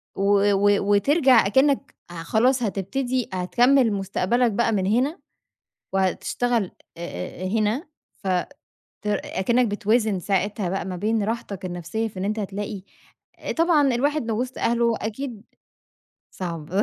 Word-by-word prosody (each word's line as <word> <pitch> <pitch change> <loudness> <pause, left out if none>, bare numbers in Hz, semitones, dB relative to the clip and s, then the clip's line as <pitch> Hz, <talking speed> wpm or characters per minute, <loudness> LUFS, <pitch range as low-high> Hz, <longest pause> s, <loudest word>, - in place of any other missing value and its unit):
و 200 +1 +3
و 200 +1 +3 0.2
وترجع 260 - +5
أكنّك 270 +5 +2
خلاص 220 +10 +1
هتبتدي 245 +5 -2
هتكمل 240 +6 +3
مستقبلك 200 +5 +1
بقى 230 +2 +1
من 195 -4 0
هنا، 255 - +1 0.7
وهتشتغل 195 +3 0 0.3
آآ 170 +1 -6
آآ - - -1
هنا، 220 - 0 0.4
ف - - -4 0.8
تر 210 0 0
أكنّك 240 +6 +1
بتوازن 210 -1 +1
ساعتها 195 +1 -1
بقى 190 +1 -2
ما 185 0 -4
بين 215 +4 0
راحتك 205 -3 -4
النفسيّة 175 +5 -3
في 195 - -11
إن 185 - -2
أنت 215 +2 -1
هتلاقي، 205 0 -4 0.6
آآ - - -4
طبعًا 325 -4 +3
الواحد 285 +2 0
لو 220 0 0
وسط 255 +1 -4
أهله 235 0 +2
أكيد 225 0 -5 0.9
صعب. 165 -4 -6
215 Hz, 130 wpm, -24 LUFS, 195-245 Hz, 0.9 s, وترجع